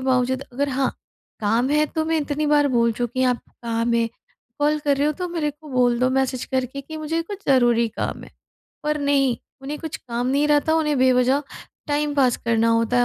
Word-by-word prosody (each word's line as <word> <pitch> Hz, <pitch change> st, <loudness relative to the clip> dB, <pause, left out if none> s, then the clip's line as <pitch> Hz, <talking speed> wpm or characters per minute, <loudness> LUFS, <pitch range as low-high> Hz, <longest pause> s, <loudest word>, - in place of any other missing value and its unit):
बावजूद 260 Hz, 0 st, +1 dB
अगर 285 Hz, +3 st, -1 dB
हाँ, 265 Hz, 0 st, 0 dB, 0.5 s
काम 230 Hz, +6 st, +1 dB
है 300 Hz, +1 st, +3 dB
तो 315 Hz, 0 st, -2 dB
मैं 320 Hz, 0 st, +1 dB
इतनी 295 Hz, +1 st, -2 dB
बार 290 Hz, -1 st, +4 dB
बोल 235 Hz, -1 st, +3 dB
चुकी 245 Hz, +2 st, -1 dB
हूँ 255 Hz, -, +4 dB
आप 245 Hz, -, -1 dB, 0.3 s
काम 230 Hz, 0 st, 0 dB
है, 230 Hz, 0 st, +2 dB, 0.5 s
कॉल 300 Hz, +1 st, +2 dB
कर 285 Hz, -1 st, +3 dB
रहे 285 Hz, +2 st, +1 dB
हो 305 Hz, -, +2 dB
तो 360 Hz, -1 st, -2 dB
मेरे 325 Hz, -4 st, -1 dB
को 300 Hz, +1 st, -15 dB
बोल 245 Hz, -2 st, +2 dB
दो 255 Hz, 0 st, +3 dB
मैसेज 260 Hz, -1 st, 0 dB
करके 260 Hz, +1 st, -2 dB
कि 315 Hz, +3 st, -9 dB
मुझे 315 Hz, +2 st, -2 dB
कुछ 395 Hz, +4 st, -7 dB
ज़रूरी 240 Hz, -3 st, +4 dB
काम -, -, -4 dB
है। -, -, -15 dB, 0.5 s
पर 300 Hz, 0 st, 0 dB
नहीं 275 Hz, -3 st, +2 dB, 0.3 s
उन्हें 290 Hz, +2 st, -5 dB
कुछ 320 Hz, -1 st, -5 dB
काम 240 Hz, 0 st, -4 dB
नहीं 280 Hz, +3 st, +2 dB
रहता, 295 Hz, +2 st, +3 dB
उन्हें 300 Hz, -3 st, +1 dB
बेवजह 260 Hz, +2 st, +3 dB, 0.5 s
टाइम 290 Hz, 0 st, 0 dB
पास 255 Hz, -4 st, +3 dB
करना 230 Hz, -1 st, +2 dB
होता 230 Hz, +2 st, +2 dB
है 245 Hz, -, +5 dB
270 Hz, 210 wpm, -22 LUFS, 245-295 Hz, 0.5 s, है